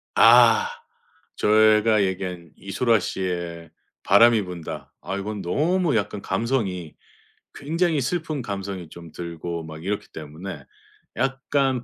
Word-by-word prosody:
아. 460 +1 +7 0.7
제가 110 0 +4
얘기한 90 -3 -4
이소라 115 +3 +1
씨의 85 -3 -4 0.3
바람이 115 +3 +6
분다 90 -3 -7
아 95 - -4
이건 105 +1 -4
너무 155 - +1
약간 105 -1 -1
감성이 95 - -2 0.6
굉장히 165 +1 0
슬픈 155 +1 -2
감성이 100 -5 -5
좀 85 0 -12
들고 85 0 -6
막 80 +1 -9
이렇기 100 +2 -3
때문에 80 +5 -8 0.8
약간 135 -3 +1
100 Hz, 235 characters per minute, -24 LUFS, 85-120 Hz, 0.8 s, 아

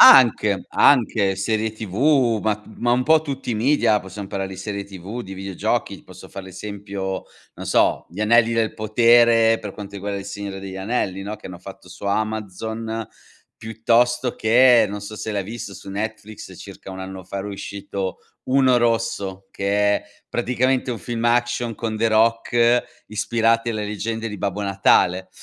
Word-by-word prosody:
Anche, 105 -6 +7
anche, 110 -7 +3
serie 110 +3 -1
TV 115 +3 +2
ma 110 0 +1
t 105 +1 -18
ma 120 0 +1
un 125 +1 +2
po' 155 +4 +5
tutti 140 -4 -5
i - - 0
media. 115 -2 +3
Possiamo 95 +1 -8
parlare 95 -1 -3
di 95 - -8
serie 100 +1 -4
TV, 100 +5 -7
di 95 -2 -8
videogiochi, 100 +2 -3
posso 90 0 -13
fare 95 - -8
l'esempio, 95 0 -5 0.3
non - - -8
so, - - +2
Gli 90 - -8
Anelli 115 +2 +4
del 115 -1 0
Potere 115 +1 +4
per 105 -3 -7
quanto 100 0 -9
riguarda 100 0 -4
Il 95 - -9
Signore 100 -1 -6
degli 95 -1 -7
Anelli, 95 -1 -2
no, 105 +2 -5
che 105 - -11
hanno 90 -1 -9
fatto 95 0 -12
su 90 +3 -11
Amazon, 110 +2 -3 0.5
piuttosto 120 +3 +1
che 120 0 +5
non 105 +1 -5
so 105 +2 -8
se 110 - -4
l'hai 100 -1 -1
visto 105 0 -7
su 100 - -10
Netflix, 110 +1 -6
circa 95 - -10
1 95 - -7
anno 95 -1 -7
fa 100 - -6
era 100 +1 -4
uscito 100 -1 -5 0.3
Uno 130 -1 +4
Rosso, 100 -5 -1
che 100 +1 +1
è - - -8 0.2
praticamente 125 +1 0
un 115 - -5
film 120 0 -4
action 120 -1 +1
con 110 0 -3
The 115 +1 +2
Rock, 115 +2 +3 0.2
ispirati 115 +2 +1
alle 110 -2 -3
leggende 110 +2 -3
di 105 -2 -7
Babbo 100 +1 -2
Natale, 95 -2 +2
110 Hz, 170 wpm, -22 LUFS, 100-115 Hz, 0.5 s, Anche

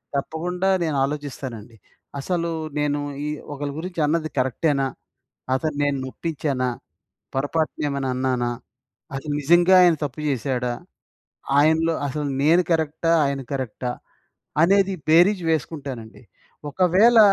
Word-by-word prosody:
తప్పకుండా 175 +6 -1
నేనాలోచిస్తానండి. 135 -6 -3 0.4
అసలు 170 +3 -1 0.3
నేను 145 0 0 0.3
ఈ - - -1 0.2
ఒకళ్ళ 145 0 -4
గురించి 175 0 -5
అన్నది 155 0 0
కరెక్టేనా? 135 +2 +1 0.7
అతను 150 +3 -1
నేను 145 -1 +1
నొప్పిచ్చానా? 140 -2 -2 0.7
పొరపాటునేమైనా 145 -1 -1
అన్నానా? 125 -1 0 0.6
అది 135 +3 -5
నిజంగా 175 +5 +5
ఆయన 175 -2 +6
తప్పు 145 +1 -5
చేశాడా? 125 -1 -1 0.9
ఆయనలో 160 +2 +3
అసలు 145 +2 -3 0.2
నేను 165 +5 +5
కరెక్టా? 160 +1 +1
ఆయన 140 0 -1
కరెక్టా? 130 -2 -3 0.7
అనేది 195 +2 +4
బేరీజు 175 +3 +5
వేసుకుంటానండి. 135 -7 -4 0.5
ఒకవేళ 190 +8 +5
145 Hz, 100 wpm, -23 LUFS, 135-165 Hz, 0.9 s, ఆయన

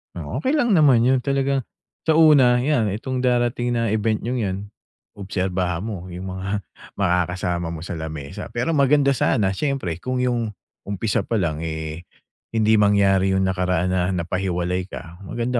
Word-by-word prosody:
Oh, - - -4
okey 265 +3 +1
lang 240 -7 +2
naman 140 -10 +5
yun. 130 +1 +3
Talagang 135 0 0 0.4
sa 160 - +4
una 140 -6 +6
iyan, 130 -6 +2
itong 130 +3 -3
darating 120 -1 +1
na 115 -2 0
event 110 0 0
niyong 125 +2 -2
'yan, 95 -4 -1 0.6
obserbahan 95 -2 -2
mo 100 -5 -5
yung 90 +1 -6
mga 100 +2 -3 0.3
makakasama 90 -2 0
mo 80 -1 -6
sa 85 -1 -5
lamesa. 80 -3 -6
Pero 125 +8 0
maganda 140 -1 +4
sana, 110 -6 +2
siyempre 95 - -2
kung 130 +2 -2
yung 120 -4 -1 0.3
umpisa 100 +2 -1
palang 85 -9 0
eh, 80 +1 -5 0.5
hindi 110 -1 +4
mangyari 95 -2 +3
yung 95 - +2
nakaraan 90 -1 0
na 90 -1 +1
napahiwalay 90 +1 -2
ka, 85 -2 -10
maganda 120 +3 -1
100 Hz, 155 wpm, -22 LUFS, 90-125 Hz, 0.6 s, una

